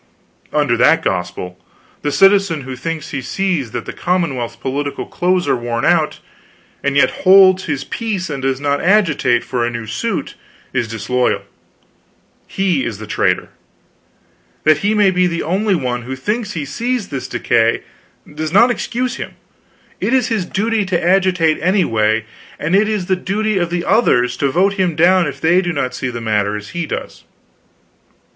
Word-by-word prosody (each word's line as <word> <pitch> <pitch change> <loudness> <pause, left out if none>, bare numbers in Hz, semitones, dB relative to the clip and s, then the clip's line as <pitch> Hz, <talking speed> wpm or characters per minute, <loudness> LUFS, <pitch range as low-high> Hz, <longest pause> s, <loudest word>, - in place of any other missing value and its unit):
Under 145 -6 +2
that 160 +7 +4
gospel, 90 0 -3 0.4
the 145 - -1
citizen 195 -3 +4
who 130 -1 -7
thinks 155 +3 -5
he 140 - -3
sees 175 -3 -1
that - - -5
the - - -6
commonwealth's 140 -10 -1
political 140 +4 -3
clothes 180 0 0
are - - +3
worn 120 +1 -2
out, 165 -3 +2 0.7
and 140 0 +1
yet - - +4
holds 190 0 +6
his 145 -3 -2
peace 205 0 -3
and 140 -3 -5
does 135 0 -1
not 145 0 0
agitate 165 - +2
for 125 -2 -2
a 120 - 0
new 115 -1 -5
suit, 110 0 -3 0.4
is 120 -3 0
disloyal; 115 +3 -1 1.0
he 185 -8 0
is 105 -3 -4
a 110 - -7
traitor. 105 - 0 1.1
That 155 -1 +4
he 205 +4 +1
may 205 -2 +4
be 180 0 +2
the 170 -1 -2
only 195 +5 +1
one 125 -6 -2
who 130 +2 -6
thinks 210 - -3
he 155 -4 -3
sees 235 - -2
this 135 - -5
decay, 115 -1 +1 0.5
does 155 +1 -4
not 235 +7 +5
excuse 245 +1 -2
him; - - -7 0.6
it 265 - +1
is 255 -2 +1
his 215 -6 -1
duty 215 +3 0
to 185 -3 0
agitate 180 -3 +2
anyway, 115 - +1 0.3
and 165 +5 0
it 210 +2 +3
is 210 -4 -1
the 185 - +1
duty 205 +2 -1
of 175 -1 -1
the 175 0 -2
others 125 - +3
to 140 - +1
vote 190 +8 +2
him 185 -4 0
down 175 +1 +4
if 145 - -6
they 175 +3 +3
do 175 -2 -2
not 140 -5 -2
see 130 - -3
the 120 -1 -5
matter 105 -2 0
as 105 -1 -9
he 170 -2 -4
does. - - -6
160 Hz, 175 wpm, -17 LUFS, 125-190 Hz, 1.1 s, holds